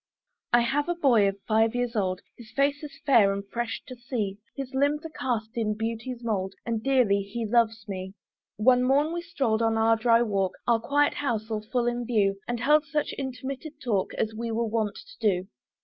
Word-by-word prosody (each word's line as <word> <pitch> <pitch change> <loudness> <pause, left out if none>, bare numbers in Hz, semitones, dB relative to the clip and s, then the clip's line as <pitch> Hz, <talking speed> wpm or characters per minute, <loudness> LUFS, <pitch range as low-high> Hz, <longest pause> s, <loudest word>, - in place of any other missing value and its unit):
I 240 - +6
have 290 +7 0
a 350 - +1
boy 245 -11 +4
of 195 0 -2
five 225 +1 +3
years 245 -1 -1
old, 185 -3 0
His 235 -3 -13
face 280 +1 +2
is 295 -2 -9
fair 230 -8 +5
and 200 0 -4
fresh 235 +2 -3
to 255 - -9
see; 235 -5 -3 0.2
His 270 -1 -5
limbs 285 +3 +1
are - - -4
cast 230 -7 -2
in 215 -3 -1
beauty's 230 +2 -4
mould, 195 -4 -2
And 230 -2 -1
dearly 245 -6 +3
he 215 +4 -4
loves 225 0 +1
me. 190 0 -6 0.4
One 250 +4 +5
morn 280 +5 +2
we 345 - -2
stroll'd 270 -11 0
on 225 -1 +2
our 225 0 +4
dry 230 +1 +4
walk, 195 -4 0
Our 235 -1 +4
quiet 290 +5 +2
house 225 -5 -2
all 215 -1 -1
full 245 -2 +1
in 240 0 -1
view, 200 -4 +2
And 240 -1 -2
held 300 +4 +4
such 300 0 -1
intermitted 275 +3 -6
talk 210 -6 -1
As 220 0 -1
we 230 +1 -4
are - - -2
wont 225 -2 0
to - - -14
do. 190 -4 +1
235 Hz, 205 wpm, -27 LUFS, 215-265 Hz, 0.4 s, I